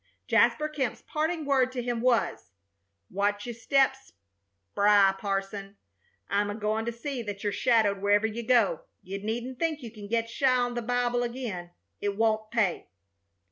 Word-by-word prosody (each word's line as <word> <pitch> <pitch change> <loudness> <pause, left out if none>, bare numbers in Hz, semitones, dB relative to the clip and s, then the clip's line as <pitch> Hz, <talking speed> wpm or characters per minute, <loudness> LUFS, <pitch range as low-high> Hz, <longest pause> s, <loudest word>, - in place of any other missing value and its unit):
Jasper 305 - +3
Kemp's 275 -6 -3
parting 315 +1 -2
word 265 -2 +2
to 250 -2 -3
him 240 -1 -2
was: 240 -3 +1 0.6
"Watch 205 +1 0
your 240 - -4
steps 270 +3 +1 0.6
spry, 200 - +5
parson. 195 0 -4 0.5
I'm 205 +1 +1
agoin' 215 +1 -1
to 235 - -1
see 250 +2 -5
that 205 -2 -6
you're 205 -1 0
shadowed 220 -5 +2
wherever 205 +1 +3
you 220 +1 -3
go. 235 -3 +3 0.2
You 195 +2 -5
needn't 240 +4 -4
think 315 -4 -1
you 230 - -7
can 210 -3 -10
get 230 +1 0
shy 255 +2 +2
on 245 0 0
the 240 - -2
Bible 245 +1 0
again. 235 -8 -4 0.3
It 205 -1 -2
won't 220 -1 +1
pay." 215 -7 0
230 Hz, 160 wpm, -28 LUFS, 205-250 Hz, 0.6 s, spry